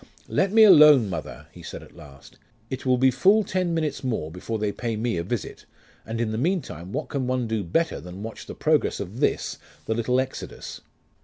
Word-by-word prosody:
'Let 195 0 +1
me 220 +1 +7
alone, 150 - +7
mother,' 75 -4 -6
he 85 - -13
said, 80 - -8
at - - -17
last. 70 -1 -15 0.3
'It 130 0 -5
will 125 0 +4
be 130 +1 +4
full 205 +9 +4
ten 185 -2 -1
minutes 160 -4 -2
more 110 -12 -2
before 90 +6 -4
they 105 -1 -1
pay 115 +1 -3
me 115 0 -1
a - - 0
visit, 110 +4 -5 0.4
and 115 +1 -4
in 115 -2 -1
the 110 - -2
meantime 125 - -2
what - - -3
can 135 -3 -2
one 130 -1 0
do 110 -2 -1
better 160 - -1
than 90 +3 -9
watch 115 0 -8
the - - -7
progress - - +1
of - - -6
this, - - 0 0.3
the 110 - 0
little 120 +3 +1
Exodus? 130 0 -6
120 Hz, 210 wpm, -25 LUFS, 95-150 Hz, 0.4 s, me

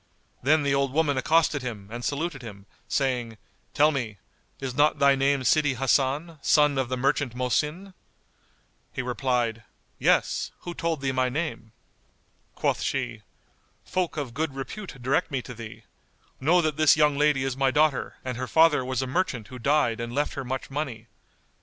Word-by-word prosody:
Then 150 +3 +3
the 140 -1 +1
old 140 -1 +1
woman 150 -2 +2
accosted 155 +2 +2
him 110 -6 -6
and 120 +1 -6
saluted 145 0 -2
him, 100 -4 -10 0.2
saying, 125 -5 -1 0.4
"Tell 150 +2 +5
me, 120 -8 -3 0.4
is 135 -2 -4
not 145 +4 +3
thy 140 0 +5
name 135 0 +1
Sidi 145 0 +3
Hasan, 140 +5 0
son 150 -2 +4
of 130 -2 -1
the 130 - -1
merchant 135 -1 0
Mohsin?" 150 +9 -1 1.0
He 130 - -4
replied, 120 -2 -1 0.4
"Yes, - - +2
who 175 - -6
told 165 -4 -2
thee 135 -1 0
my 130 -1 +1
name?" 140 -5 -4 0.8
Quoth - - 0
she, - - -2 0.6
"Folk 180 -3 -2
of 135 -6 -4
good 150 -1 -2
repute 135 +3 -7
direct 130 +8 0
me 135 -4 -2
to 125 - -8
thee. 115 -2 -10 0.6
Know 170 +6 +4
that 155 -2 -1
this 155 0 +5
young 150 -1 +4
lady 145 -2 +2
is 135 -2 -2
my 135 0 +2
daughter 150 0 +1
and 130 -2 -3
her 130 0 -3
father 160 -3 +4
was 130 0 -2
a - - -2
merchant 130 - -2
who 125 - -9
died 140 -3 +2
and 120 +1 -5
left 145 +1 0
her 135 - -4
much 130 +2 -5
money. 135 -6 -4
135 Hz, 170 wpm, -26 LUFS, 125-150 Hz, 1.0 s, Tell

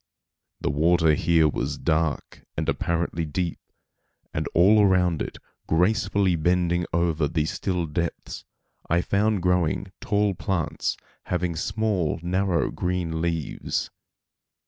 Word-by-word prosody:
The - - 0
water 80 +1 +3
here 80 +1 +3
was 75 - -2
dark 80 -1 -1
and - - -1
apparently 85 0 -1
deep, 85 +3 -2 0.7
and - - -2
all 100 +5 +6
around 90 -4 +3
it, - - -4 0.3
gracefully 95 +1 +2
bending 85 +1 +1
over 80 -3 +1
the 80 0 0
still 90 +1 -2
depths, 85 +2 -4 0.5
I 85 +1 +3
found 100 0 +1
growing 90 +1 +1
tall 105 -1 +1
plants 90 -2 -2 0.3
having 90 -1 -1
small, 95 -2 -1
narrow 90 -1 +1
green 90 -3 -2
leaves. 85 -3 -2
85 Hz, 115 wpm, -25 LUFS, 80-95 Hz, 0.7 s, all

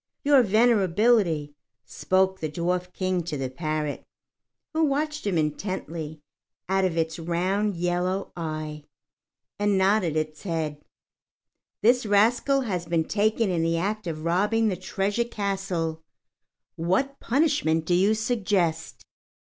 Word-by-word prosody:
"Your 280 -2 +6
Venerability," 205 -7 +3 0.3
spoke 190 +6 +1
the 155 - -3
Dwarf 180 +3 -2
King 185 -1 -1
to 165 -3 -4
the 130 -1 -3
parrot, 155 +1 -3 0.7
who 320 0 +2
watched 300 -1 -1
him 185 -4 +1
intently 160 -1 -3 0.5
out 190 +1 +1
of 170 -3 -1
its 160 0 -1
round 185 +5 0
yellow 180 +2 -1
eye, 155 -2 -5 0.7
and 205 -1 +2
nodded 190 -4 +2
its 155 0 -3
head, 160 -5 -3 1.0
"this 245 +3 +4
rascal 235 +7 +3
has 180 -8 -3
been 165 -1 +1
taken 215 +1 +1
in 170 -2 0
the 165 0 +1
act 205 +3 -2
of 155 -2 -4
robbing 210 +6 +2
the 190 - -1
treasure 195 +5 -1
castle. 195 -7 -3 0.7
What 190 +12 0
punishment 255 - +1
do 175 - +1
you 195 +5 +4
suggest?" 195 -8 -1
185 Hz, 125 wpm, -26 LUFS, 165-215 Hz, 1.0 s, Your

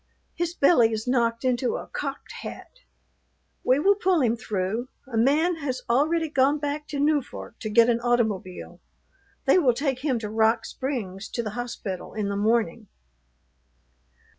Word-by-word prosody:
His 345 0 -2
belly 260 -8 +5
is 220 -1 -3
knocked 235 -1 +1
into 250 -1 +1
a - - -5
cocked 275 -1 -5
hat. - - -9 0.8
We 255 - +4
will 390 +8 +4
pull 375 -3 +2
him 235 -2 +2
through. 215 +2 -2 0.2
A 260 -3 -7
man 300 +9 +3
has 265 -4 -4
already 315 +7 +2
gone 280 0 +2
back 295 0 -3
to 285 - -4
Newfork 290 -2 -1
to 215 - -4
get 230 +2 +5
an 235 -1 +2
automobile. 220 -7 -1 0.7
They 275 +6 +5
will 255 -8 +3
take 270 -1 -1
him 265 -2 0
to 220 -2 -4
Rock 220 +1 +2
Springs 215 -8 -4
to 235 - -3
the 215 - -4
hospital 220 -5 -5
in 210 -2 -1
the 200 - -2
morning." 215 -1 0
245 Hz, 160 wpm, -25 LUFS, 225-285 Hz, 0.8 s, belly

